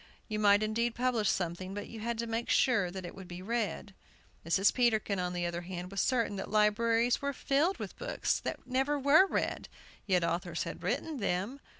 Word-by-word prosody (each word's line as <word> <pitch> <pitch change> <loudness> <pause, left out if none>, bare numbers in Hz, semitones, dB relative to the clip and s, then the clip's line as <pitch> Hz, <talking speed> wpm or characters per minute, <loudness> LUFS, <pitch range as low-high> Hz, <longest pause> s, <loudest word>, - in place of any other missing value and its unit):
You 215 -1 -3
might 205 0 +5
indeed 230 +2 0
publish 240 -4 +1
something, 185 +2 -2
but 205 - -5
you 225 - -9
had 235 +1 -2
to 235 - -2
make 230 +1 -3
sure 230 -9 +3
that 185 0 -7
it 175 - -7
would 190 -2 -10
be 175 0 -8
read. 215 -2 -2 0.5
Mrs. 190 +5 +3
Peterkin, 220 -5 +1
on 180 0 -1
the 175 -1 -2
other 175 0 -3
hand, 180 +1 -6
was 195 - 0
certain 230 -5 +1
that 195 - -5
libraries 225 +3 +2
were 280 0 -1
filled 290 +8 +1
with - - -7
books - - -1
that - - -5
never 265 +3 0
were 285 +7 +6
read, - - -2 0.4
yet 180 -3 +3
authors 170 0 -1
had - - -7
written 315 -3 -2
them. 200 +5 -2
215 Hz, 200 wpm, -31 LUFS, 185-245 Hz, 0.5 s, were